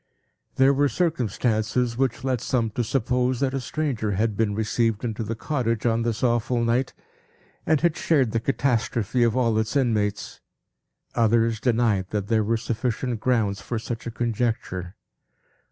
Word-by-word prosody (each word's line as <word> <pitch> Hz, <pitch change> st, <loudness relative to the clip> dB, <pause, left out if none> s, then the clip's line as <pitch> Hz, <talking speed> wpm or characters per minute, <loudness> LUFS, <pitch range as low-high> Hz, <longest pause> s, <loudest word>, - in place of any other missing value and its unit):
There 135 Hz, +1 st, +5 dB
were 145 Hz, +1 st, +2 dB
circumstances 120 Hz, -, 0 dB
which 130 Hz, -1 st, -1 dB
led 130 Hz, -3 st, 0 dB
some 115 Hz, -4 st, 0 dB
to 120 Hz, -, -1 dB
suppose 125 Hz, +1 st, 0 dB
that 135 Hz, -1 st, 0 dB
a 135 Hz, -, -1 dB
stranger 125 Hz, -5 st, -2 dB
had 105 Hz, +2 st, 0 dB
been 105 Hz, -1 st, 0 dB
received 110 Hz, 0 st, 0 dB
into 115 Hz, -1 st, -3 dB
the 115 Hz, +1 st, -3 dB
cottage 115 Hz, -4 st, -2 dB
on 115 Hz, -1 st, +2 dB
this 115 Hz, -1 st, -2 dB
awful 120 Hz, 0 st, +1 dB
night, 120 Hz, +3 st, 0 dB, 0.7 s
and 155 Hz, -2 st, +3 dB
had 170 Hz, -2 st, +2 dB
shared 135 Hz, -8 st, +2 dB
the 115 Hz, -, +1 dB
catastrophe 120 Hz, -2 st, 0 dB
of 115 Hz, 0 st, +3 dB
all 115 Hz, -3 st, +2 dB
its 110 Hz, +5 st, -2 dB
inmates. 110 Hz, -7 st, 0 dB, 0.7 s
Others 115 Hz, 0 st, +2 dB
denied 110 Hz, -6 st, +1 dB
that 100 Hz, -2 st, -3 dB
there 110 Hz, -2 st, +3 dB
were 115 Hz, +2 st, +1 dB
sufficient 120 Hz, +1 st, -2 dB
grounds 110 Hz, -5 st, 0 dB
for 120 Hz, -, -3 dB
such 115 Hz, +1 st, -5 dB
a -, -, -3 dB
conjecture. 110 Hz, -6 st, -2 dB
115 Hz, 155 wpm, -24 LUFS, 110-125 Hz, 0.7 s, There